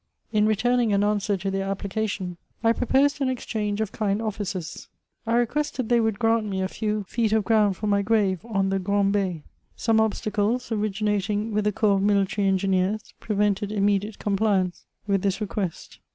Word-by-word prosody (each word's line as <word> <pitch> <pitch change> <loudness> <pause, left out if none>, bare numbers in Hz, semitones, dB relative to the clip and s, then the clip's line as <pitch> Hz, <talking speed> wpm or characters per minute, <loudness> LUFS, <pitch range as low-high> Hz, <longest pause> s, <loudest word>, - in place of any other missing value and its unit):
In 215 -1 +3
returning 235 +2 +2
an 200 0 +3
answer 205 -1 +1
to 195 +1 -3
their 195 0 -2
application, 195 -2 -3 0.3
I 230 0 +4
proposed 275 +4 +2
an 265 - +2
exchange 215 -4 -2
of 215 -2 -2
kind 205 -2 -1
offices. 200 -6 -4 0.4
I 230 - +2
requested 245 0 0
they 240 -1 +4
would 220 -2 +1
grant 225 -1 +2
me 190 -2 -2
a 190 - 0
few 210 +1 -2
feet 220 +3 -1
of 220 -1 +3
ground 210 -4 +3
for 215 - -4
my 200 -1 +2
grave 200 -3 +1
on 195 -4 0
the 195 0 0
Grand'Be.* 195 -3 0 0.3
Some 225 -1 +2
obstacles, 220 +2 -1
originating 210 0 -1
with 210 0 0
the 210 - +3
corps 205 -1 +2
of - - 0
military 200 0 +2
engineers, 190 +2 0
prevented 205 -1 0
immediate 205 0 0
compliance 195 -3 0 0.2
with 200 -2 +1
diis 195 -1 0
request. 200 -4 -4
210 Hz, 170 wpm, -25 LUFS, 195-220 Hz, 0.4 s, I